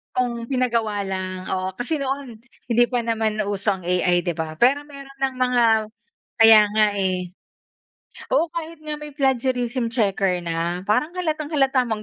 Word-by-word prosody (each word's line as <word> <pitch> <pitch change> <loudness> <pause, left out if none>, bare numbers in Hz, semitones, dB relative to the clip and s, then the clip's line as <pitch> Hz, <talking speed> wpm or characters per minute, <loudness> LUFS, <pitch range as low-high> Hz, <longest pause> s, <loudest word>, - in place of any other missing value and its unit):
Kung 240 -2 -1
pinagawa 230 -6 0
lang, 185 -1 -4
oo. 185 0 -1
Kasi 285 +5 -2
noon, 270 -4 -4 0.2
hindi 240 0 +3
pa 245 -2 0
naman 220 -2 -1
uso 200 +1 -1
ang 180 - -13
AI, 180 0 +1
di 175 - 0
ba, 155 0 -5
pero 270 - +4
meron 275 -2 -12
ng 265 -1 0
mga 250 -1 +2 0.8
kaya 225 -1 +9 0.2
nga, 215 -1 +5
eh. 185 -2 -1 1.0
Oo, 340 -9 +2
kahit 330 -1 -6
nga 300 -1 -4
may 300 0 -9
plagiarism 255 -3 0
checker 195 -5 +1
na, 170 +1 -2
parang 300 - 0
halatang-halata 305 -6 0
mong 220 -2 -3
235 Hz, 155 wpm, -22 LUFS, 190-270 Hz, 1.0 s, kaya